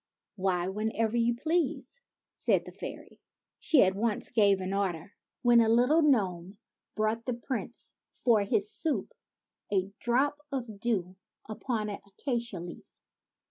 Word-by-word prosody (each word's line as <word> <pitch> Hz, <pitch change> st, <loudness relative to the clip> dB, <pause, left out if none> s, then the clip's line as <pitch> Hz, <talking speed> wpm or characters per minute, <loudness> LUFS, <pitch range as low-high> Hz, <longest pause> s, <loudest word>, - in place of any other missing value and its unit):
"Why, 185 Hz, -3 st, 0 dB
whenever 220 Hz, +3 st, -1 dB
you 235 Hz, 0 st, +2 dB
please," 330 Hz, -, -1 dB, 0.3 s
said -, -, +1 dB
the -, -, -8 dB
fairy. -, -, -8 dB, 0.4 s
She 305 Hz, -, +5 dB
at 190 Hz, 0 st, +3 dB
once 215 Hz, +2 st, -1 dB
gave 205 Hz, -4 st, +4 dB
an 190 Hz, +1 st, -3 dB
order, 190 Hz, -2 st, -2 dB, 0.3 s
when 240 Hz, -1 st, +6 dB
a 225 Hz, -, +3 dB
little 250 Hz, +8 st, +4 dB
gnome 195 Hz, -, +1 dB, 0.4 s
brought 215 Hz, +2 st, -1 dB
the 250 Hz, -, 0 dB
Prince 240 Hz, 0 st, -5 dB, 0.2 s
for 230 Hz, -4 st, +2 dB
his 200 Hz, +1 st, 0 dB
soup 325 Hz, +9 st, -2 dB, 0.6 s
a 195 Hz, -1 st, +1 dB
drop 275 Hz, +5 st, +1 dB
of 235 Hz, -7 st, -4 dB
dew 190 Hz, -5 st, -1 dB, 0.3 s
upon 220 Hz, 0 st, -2 dB
an 200 Hz, -, -5 dB
acacia 235 Hz, -1 st, -3 dB
leaf. 175 Hz, 0 st, -10 dB
220 Hz, 140 wpm, -30 LUFS, 195-240 Hz, 0.6 s, when